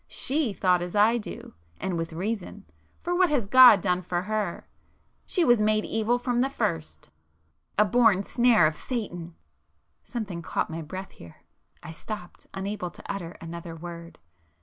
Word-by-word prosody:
She 280 -4 +1
thought 180 -2 +2
as 175 +2 -5
I 220 +3 +4
do,—and 85 - -7
with 165 0 -3
reason,—for 210 - -5
what 365 -1 +4
has 280 -8 +1
God 245 -2 +8
done 180 -1 0
for 175 0 -2
her? 210 -3 -3 0.6
She 355 -4 +2
was 240 -3 +4
made 215 0 +2
evil 225 +2 0
from 245 0 0
the 265 - +1
first,—a 80 - -4
born 210 -2 +4
snare 235 -5 +4
of 155 0 +1
Satan...." 175 -7 -5 0.7
Something 205 -8 -5
caught 165 - -2
my 165 +1 -4
breath 185 +5 -7
here,—I 85 - -15
stopped, 180 +2 -8
unable 195 -1 -4
to - - -14
utter 175 -4 -6
another 165 0 -7
word. 170 0 -9
190 Hz, 145 wpm, -26 LUFS, 170-225 Hz, 0.7 s, God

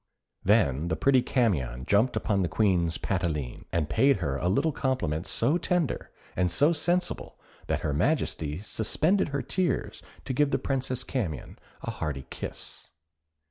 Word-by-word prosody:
Then 85 - +3
the 80 - 0
pretty 130 +4 +4
Camion 70 - 0
jumped 110 +5 +3
upon 100 -4 +1
the 90 - +1
Queen's 90 -6 +2
palatine, 80 -9 -2
and 80 -3 0
paid 135 - +4
her 70 -8 -2
a 85 +6 0
little 155 - +2
compliment 115 - -1
so 145 +10 +2
tender 175 -5 0 0.3
and 90 0 +2
so 145 - +4
sensible 175 +2 -1 0.3
that - - 0
her 75 - -1
Majesty 80 - 0
suspended 155 - +1
her 140 -2 -2
tears 185 +6 -1 0.2
to 130 - -2
give 145 +2 +3
the - - +1
Princess 130 -2 -2
Camion 95 - -4 0.2
a - - -2
hearty 70 -3 -4
kiss. - - -6
105 Hz, 150 wpm, -28 LUFS, -, 0.3 s, pretty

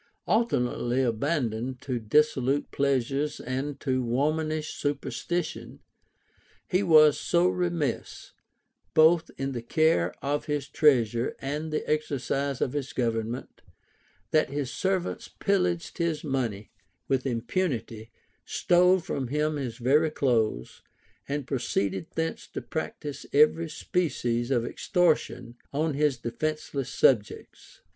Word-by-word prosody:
Alternately 130 - +1
abandoned 125 -1 -1
to 130 -3 -2
dissolute 135 +3 +2
pleasures 140 +1 0
and 135 +3 -4
to 130 -2 0
womanish 155 +5 -1
superstition, 155 +3 -3 0.9
he 185 - +2
was 155 -5 +6
so 175 +1 +2
remiss, 175 -5 -2 0.6
both 160 +1 +5
in 135 0 -2
the 120 -3 -4
care 120 - +2
of 145 +1 -1
his 145 -2 -2
treasure 120 -6 +2
and 150 +3 -4
the 155 - -2
exercise 140 -2 -1
of 130 - 0
his 145 0 -3
government, 115 0 -2 0.7
that 155 -3 +3
his 140 -2 -3
servants 190 -2 -1
pillaged 180 -4 -1
his 165 -2 0
money 120 -8 -2 0.4
with 135 0 0
impunity, 120 - -2 0.3
stole 180 +1 +4
from 140 -7 -3
him 150 +3 0
his 130 -5 -4
very 145 +6 +3
clothes, 115 - 0 0.5
and 145 -1 -2
proceeded 100 - -1
thence 160 0 -2
to - - -5
practise 150 -2 -5
every 155 +3 +4
species 125 -10 -1
of 120 -3 +1
extortion 160 - 0
on 155 +2 0
his 145 -2 +1
defenceless 140 +2 -3
subjects. 110 -6 0
140 Hz, 115 wpm, -27 LUFS, 125-155 Hz, 0.9 s, was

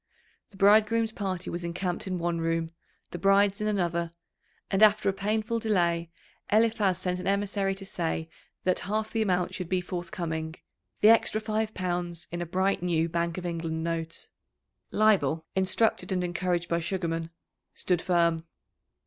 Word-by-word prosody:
The 195 - -17
bridegroom's 220 +3 +4
party 190 -4 -3
was 175 0 -4
encamped 180 +3 -3
in 185 -1 -2
one 170 -1 -1
room, 165 0 -1 0.4
the 175 - -5
bride's 195 +2 +3
in 210 - 0
another, 170 -4 -1 0.6
and 195 - +1
after 215 -1 +5
a - - 0
painful 215 +4 -1
delay 170 -6 +1 0.4
Eliphaz 215 -3 +3
sent 180 -1 -1
an 180 - -5
emissary 200 0 0
to 195 0 -7
say 165 -3 -2 0.4
that 185 -1 +2
half 215 +1 -1
the 225 - 0
amount 180 -3 +1
should 180 -2 -5
be 185 - +2
forthcoming, 170 -3 -4 0.5
the 210 - +7
extra 225 -1 +4
five 215 0 -2
pounds 175 -2 -2
in 175 0 -4
a 175 - -3
bright 190 +3 +1
new 165 -2 +1
Bank 170 0 -1
of 180 - -5
England 165 -1 -3
note. 165 -1 -3 0.6
Leibel, 165 -8 +3
instructed 190 +3 +2
and 180 -1 0
encouraged 175 0 -1
by 170 - 0
Sugarman, 165 -2 -2 0.5
stood 180 -2 0
firm. 170 -2 +2
180 Hz, 155 wpm, -28 LUFS, 170-205 Hz, 0.6 s, the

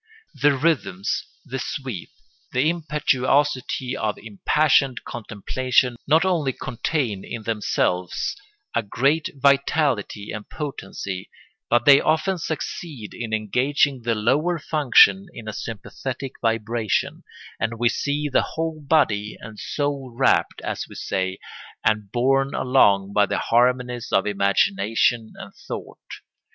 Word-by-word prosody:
The 140 -1 +3
rhythms, 130 - 0 0.2
the 135 - -4
sweep, 125 - -5 0.4
the 140 +6 +3
impetuosity 140 -4 0
of 105 -1 -2
impassioned 130 +5 +2
contemplation 125 +3 0
not 160 +4 +4
only 160 -8 +1
contain 120 -5 -2
in 115 -2 -6
themselves 95 -5 -1 0.4
a - - +2
great 135 +9 +1
vitality 140 -6 +1
and 105 -1 -7
potency, 95 - -6 0.4
but 120 +2 +3
they 140 -1 +8
often 165 +4 +1
succeed 155 - -5
in 115 -2 -5
engaging 125 +5 +1
the 115 0 0
lower 145 +11 +1
functions 155 +5 +4
in 115 -2 -9
a 110 - -4
sympathetic 125 +5 -6
vibration, 115 -1 -1 0.4
and 115 +1 -2
we 120 +1 +2
see 145 +4 -1
the 140 - +3
whole 160 -1 -4
body 115 -9 +1
and 110 -1 -10
soul 140 -3 -3
rapt, 135 - +2
as - - -3
we - - -11
say, 95 0 -2 0.5
and 105 -2 +1
borne 135 +3 +2
along 100 -7 +3
by 105 -1 +4
the - - -1
harmonies 125 0 +1
of 95 - +3
imagination 100 +3 +1
and - - -10
thought. - - -9
125 Hz, 120 wpm, -23 LUFS, 110-145 Hz, 0.5 s, they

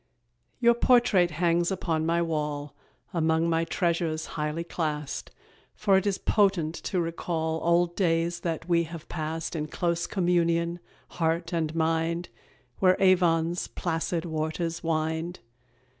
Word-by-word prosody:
Your 235 -1 +5
portrait 235 -7 +4
hangs 170 +1 +1
upon 165 -4 -1
my 170 +1 +2
wall, 150 -3 -3 0.4
Among 160 -1 +2
my 165 0 +1
treasures 165 -2 -1
highly 150 +2 -2
classed, 150 -4 -3 0.5
For 200 -2 +3
it 190 +2 +2
is 195 -1 +1
potent 190 -7 +2
to 180 - -3
recall 165 -1 -2
Old 170 0 +2
days 170 -2 +1
that 165 -1 -3
we 170 -1 +3
have 165 0 -9
passed 160 +1 -4
In 155 -1 -2
close 170 +1 -1
communion, 170 -2 +1 0.3
heart 165 0 -1
and 160 -2 -1
mind, 165 +1 0 0.5
Where 185 -1 +4
Avon's 175 -3 +3
placid 165 0 -2
waters 160 +1 -3
wind. 160 +1 -1
170 Hz, 130 wpm, -27 LUFS, 160-175 Hz, 0.5 s, Your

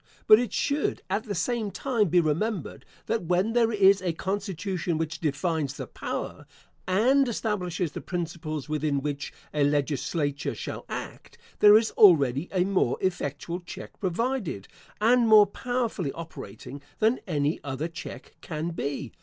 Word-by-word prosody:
But 215 - +8
it 240 -4 -2
should 285 +5 -1
at 210 +4 0
the 205 -3 -4
same 220 +4 -1
time 225 +1 0
be 180 - +4
remembered, 170 +3 -1 0.2
that 225 -6 -1
when 180 +6 +1
there 235 -1 +3
is 200 -2 +5
a 180 -3 -1
constitution 190 -2 -2
which 160 +1 -3
defines 155 -2 -1
the - - -5
power, - - -6 0.4
and 255 +9 +3
establishes 180 -7 -2
the - - -6
principles 160 -4 -4
within 150 -2 0
which 145 -1 -3 0.2
a 150 - +2
legislature 145 0 -1
shall - - -6
act, - - -7 0.2
there 210 0 +9
is 220 0 +1
already 145 - +5
a 185 -2 +2
more 190 -10 +1
effectual 175 -1 -2
check 175 - -10
provided, 195 - -2 0.3
and 235 +2 +4
more 215 -1 +8
powerfully 230 - -2
operating, 160 -4 -9 0.2
than 225 +4 +2
any 150 -2 0
other 140 +3 -3
check 170 +1 -9
can 160 +1 -4
be. 140 -6 -4
180 Hz, 145 wpm, -27 LUFS, 155-210 Hz, 0.4 s, there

